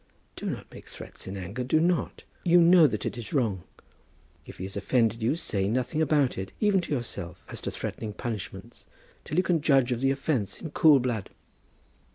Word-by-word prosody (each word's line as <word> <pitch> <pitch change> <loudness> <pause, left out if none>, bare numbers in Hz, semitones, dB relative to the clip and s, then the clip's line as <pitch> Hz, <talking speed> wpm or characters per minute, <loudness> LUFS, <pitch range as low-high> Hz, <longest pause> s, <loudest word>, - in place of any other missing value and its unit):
"Do - - -5
not - - -4
make - - -12
threats - - -10
in 95 +1 -5
anger. 100 +7 -4
Do 130 +5 +2
not! 175 +1 0 0.2
You 175 0 +5
know 170 -1 +7
that 110 -5 -3
it 120 - -3
is 115 - -7
wrong. 110 - +1 0.9
If - - -10
he - - -6
has 95 +1 -6
offended 115 -2 +1
you, 115 +7 +2
say 100 - -1
nothing 130 +8 0
about 145 -8 +2
it, 95 0 -5
even 205 -3 +3
to 170 - -8
yourself, 100 - -4
as - - -8
to - - -3
threatened 105 -2 -5
punishments, 105 -9 -6 0.4
till 155 - -4
you 180 - +4
can 170 -4 +1
judge 135 -4 +3
of 120 0 -1
the 135 - +3
offence 135 -7 -1
in 160 - -7
cool 155 -4 +6
blood." 120 -6 -2
125 Hz, 200 wpm, -27 LUFS, 105-155 Hz, 0.9 s, know